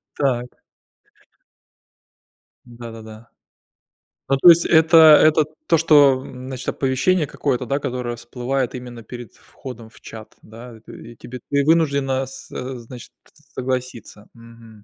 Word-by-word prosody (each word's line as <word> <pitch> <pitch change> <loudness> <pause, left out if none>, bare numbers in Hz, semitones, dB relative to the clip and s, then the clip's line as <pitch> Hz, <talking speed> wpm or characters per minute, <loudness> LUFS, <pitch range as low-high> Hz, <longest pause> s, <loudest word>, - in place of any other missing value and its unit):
Так. 125 -3 -2 2.1
Да-да-да. 115 -2 -12 1.0
Ну, 135 - +2
то 175 - +7
есть, 170 0 +6
это 160 +1 +4
это 155 -1 +6 0.2
то, 165 - +3
что 145 -4 +4
значит 130 0 -9
оповещение 145 +5 0
какое-то, 130 -2 -3
да, 140 +4 -2
которое 125 -3 -5
всплывает 125 +2 -4
именно 125 -1 -9
перед 120 -1 -11
входом 120 -4 -12
в 110 - -21
чат, 110 -1 -12
да. 115 +2 -13
И - - -19
ты 115 - -13
и - - -22
тебе, 125 +3 -10
ты 140 0 +1
вынуждена 140 -4 +1
со 130 0 -8
значит, 120 +1 -12 0.4
согласиться. 125 -4 -5
Мгм. 115 -2 -17
125 Hz, 125 wpm, -20 LUFS, 115-140 Hz, 2.1 s, то